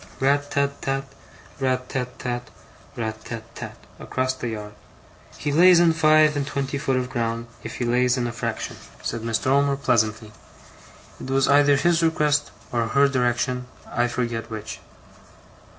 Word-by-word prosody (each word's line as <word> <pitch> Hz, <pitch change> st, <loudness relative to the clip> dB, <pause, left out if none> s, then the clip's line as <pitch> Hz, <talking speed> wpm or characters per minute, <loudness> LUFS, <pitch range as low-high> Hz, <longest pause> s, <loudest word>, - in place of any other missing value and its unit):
'RAT 145 Hz, +2 st, +2 dB
tat 140 Hz, 0 st, -1 dB
tat, 135 Hz, 0 st, -1 dB, 0.6 s
RAT 130 Hz, -1 st, 0 dB
tat 125 Hz, -1 st, -4 dB
tat, 120 Hz, -1 st, -4 dB, 0.5 s
RAT 110 Hz, -1 st, -4 dB
tat 115 Hz, -2 st, -6 dB
tat,' -, -, -8 dB, 0.2 s
across 130 Hz, 0 st, -1 dB
the 130 Hz, -2 st, -5 dB
yard. 105 Hz, -2 st, -6 dB, 0.6 s
'He 145 Hz, -, -2 dB
lays 175 Hz, +3 st, +7 dB
in 170 Hz, -1 st, +5 dB
five 155 Hz, -1 st, +5 dB
and 140 Hz, -1 st, -1 dB
twen 140 Hz, 0 st, -1 dB
ty 140 Hz, +1 st, -4 dB
foot 135 Hz, -1 st, 0 dB
of 125 Hz, 0 st, -1 dB
ground, 115 Hz, -1 st, -2 dB, 0.2 s
if -, -, -7 dB
he 120 Hz, -, -2 dB
lays 125 Hz, +1 st, +2 dB
in 125 Hz, -, 0 dB
a 120 Hz, -, -2 dB
fraction,' 115 Hz, -, -4 dB, 0.3 s
said 115 Hz, -, -3 dB
Mr. 115 Hz, -1 st, -1 dB
Omer, 140 Hz, +1 st, +3 dB
pleasantly. 110 Hz, -5 st, 0 dB, 0.9 s
'It -, -, -7 dB
was 135 Hz, 0 st, +2 dB
either 145 Hz, 0 st, +5 dB
his 165 Hz, +4 st, +2 dB
request 150 Hz, -3 st, +2 dB, 0.2 s
or 115 Hz, -1 st, 0 dB
her 140 Hz, +4 st, +4 dB
direction, 125 Hz, -1 st, 0 dB, 0.2 s
I 120 Hz, +1 st, +1 dB
forget 120 Hz, -1 st, -3 dB
which. 110 Hz, -1 st, -6 dB
130 Hz, 165 wpm, -24 LUFS, 120-140 Hz, 0.9 s, lays